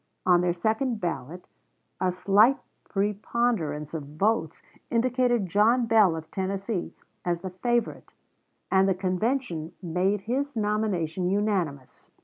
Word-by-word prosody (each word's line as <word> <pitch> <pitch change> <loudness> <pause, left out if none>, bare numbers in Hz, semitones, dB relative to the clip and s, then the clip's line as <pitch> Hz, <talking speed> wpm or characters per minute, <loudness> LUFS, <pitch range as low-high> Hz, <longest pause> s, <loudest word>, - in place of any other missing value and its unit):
On 180 -1 +5
their 180 0 +2
second 220 +5 0
ballot, 170 -1 -4 0.5
a 185 - +1
slight 205 +8 +4 0.3
preponderance 200 -7 -1
of 160 -3 -3
votes 195 -5 0 0.3
indicated 240 -2 +2
John 215 +7 +3
Bell, 215 -7 +4
of 160 0 -8
Tennessee, 195 0 -3 0.3
as 175 -1 -1
the 190 -1 -5
favorite, 240 +5 -1 0.6
and 190 0 +4
the 190 - +2
convention 185 - -1
made 185 +3 0
his 270 +5 -2
nomination 200 -5 0
unanimous. 185 -10 -2
195 Hz, 120 wpm, -26 LUFS, 175-225 Hz, 0.6 s, On